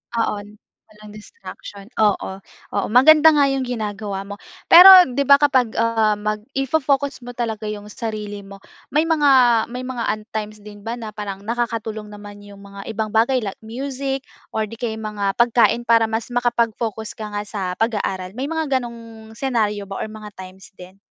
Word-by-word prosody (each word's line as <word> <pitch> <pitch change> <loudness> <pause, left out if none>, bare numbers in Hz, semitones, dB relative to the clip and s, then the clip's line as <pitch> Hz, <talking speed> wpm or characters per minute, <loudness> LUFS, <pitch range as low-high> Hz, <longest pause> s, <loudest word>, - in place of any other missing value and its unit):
Oo. 225 -2 0 0.5
Walang 210 -1 -15
distraction. 210 - -11 0.2
Oo. 200 -2 0 0.3
Oo, - - -1
maganda 300 +7 +6
nga 290 - +4
yung 265 -2 -2
ginagawa 210 -4 -4
mo. 200 +1 -9 0.3
Pero, 355 +3 +11 0.2
'di 260 - -4
ba 280 - +9
kapag, 265 -5 +2
ah, 225 -2 +2
mag 210 +1 -3 0.2
i-fo-focus 275 0 0
mo 245 - -8
talaga 220 -3 -3
yung 210 0 -7
sarili 210 -3 -5
mo. 195 0 -13 0.2
May 300 +1 +1
mga, 270 -8 +4
may 250 +1 -6
mga 255 -2 -4
un 215 - -13
times 215 -1 -6
din 205 0 -12
ba 235 - -2
na 225 -3 -7
parang 200 -2 -7
nakakatulong 225 -1 -3
naman 205 0 -11
yung 200 -1 -14
mga 200 0 -11
ibang 220 -1 -3
bagay, 235 +3 +2
like 195 -2 -6
music 270 +4 -5 0.3
or 220 - +1
'di 225 +2 -8
kaya 230 -2 -3
mga 210 -3 -3
pagkain, 235 0 +3
para 230 -1 +3
mas 225 +2 -4
makapag-focus 230 -2 -1
ka 210 -1 -6
nga 205 - -2
sa 195 -4 -4
pag-aaral? 195 -5 -2
May 255 +7 -5
mga 310 -4 -1
ganong 230 -2 -11
scenario 220 -6 -1
ba 195 0 -7
or - - -3
mga 215 -1 -10
times 185 0 -12
din? 185 0 -14
220 Hz, 175 wpm, -20 LUFS, 210-245 Hz, 0.5 s, Pero